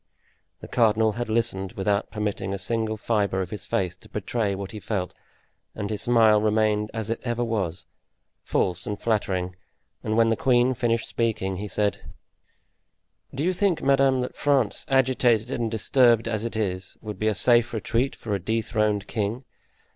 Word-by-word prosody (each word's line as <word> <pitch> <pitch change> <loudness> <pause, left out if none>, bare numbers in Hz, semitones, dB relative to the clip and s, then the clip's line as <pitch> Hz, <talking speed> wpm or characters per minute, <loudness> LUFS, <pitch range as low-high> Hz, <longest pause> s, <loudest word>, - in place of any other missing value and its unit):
The - - -8
cardinal 110 -2 +3
had 120 +2 -4
listened 110 -5 -1
without 100 +1 0
permitting 105 -2 -3
a - - -4
single 110 +2 -1
fibre 105 -4 0
of 90 - -9
his 105 - -6
face 90 -2 -1
to - - -17
betray 105 0 -1
what 100 0 -6
he 110 - -7
felt, 90 0 -3 0.6
and 105 0 -4
his 105 -1 -2
smile 110 -3 +4
remained 105 0 +1
as 110 0 -4
it 115 - -2
ever 120 -1 -1
was—false 95 -3 -3
and 105 -1 -3
flattering; 95 -5 -1 0.5
and 110 +1 -1
when 115 0 +5
the 115 - +2
queen 125 +1 +3
finished 115 -2 0
speaking, 110 -5 -1
he 105 +2 -4
said: 100 0 -1 1.3
"Do 140 - -2
you 185 +2 +2
think, 185 -2 +1
madame, 135 -1 +3
that 125 - -4
France, 135 -7 +1
agitated 125 -3 +2
and 115 -3 -1
disturbed 115 +1 +3
as 110 -1 -2
it 115 - -4
is, 95 -4 -3
would 105 -3 -7
be 110 - 0
a 110 - +2
safe 120 +2 +4
retreat 120 +3 -1
for 110 - -5
a 100 - 0
dethroned 105 0 0
king? 110 +3 -2
110 Hz, 170 wpm, -25 LUFS, 100-120 Hz, 1.3 s, when